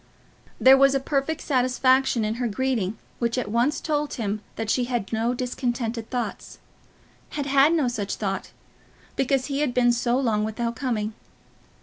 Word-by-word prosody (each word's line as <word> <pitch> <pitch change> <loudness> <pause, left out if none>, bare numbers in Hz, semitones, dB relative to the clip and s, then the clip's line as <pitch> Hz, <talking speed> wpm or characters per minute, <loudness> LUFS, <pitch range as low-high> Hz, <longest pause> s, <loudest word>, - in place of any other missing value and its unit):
There 265 +1 +8
was 275 0 +5
a - - +3
perfect 280 +3 -1
satisfaction 255 -2 +2
in 215 - -1
her 245 - +1
greeting 225 -3 -1 0.2
which 235 0 0
at 225 -5 -2
once 245 +6 +1
told 300 -1 -2
him 215 -3 -2
that 225 - -4
she 250 - +1
had 240 -4 -3
no 230 +3 0
discontented 240 -2 -3
thoughts, 245 -2 -4 0.8
had 285 - -1
had 280 +3 +4
no 305 -6 +2
such 210 -5 -2
thought, 195 -2 -3 0.7
because 270 -1 +1
he 280 -1 -2
had 290 -5 0
been 245 -1 +4
so 240 +1 +1
long 225 -6 +1
without 230 +2 -2
coming. 225 -5 -2
245 Hz, 160 wpm, -24 LUFS, 225-270 Hz, 0.8 s, There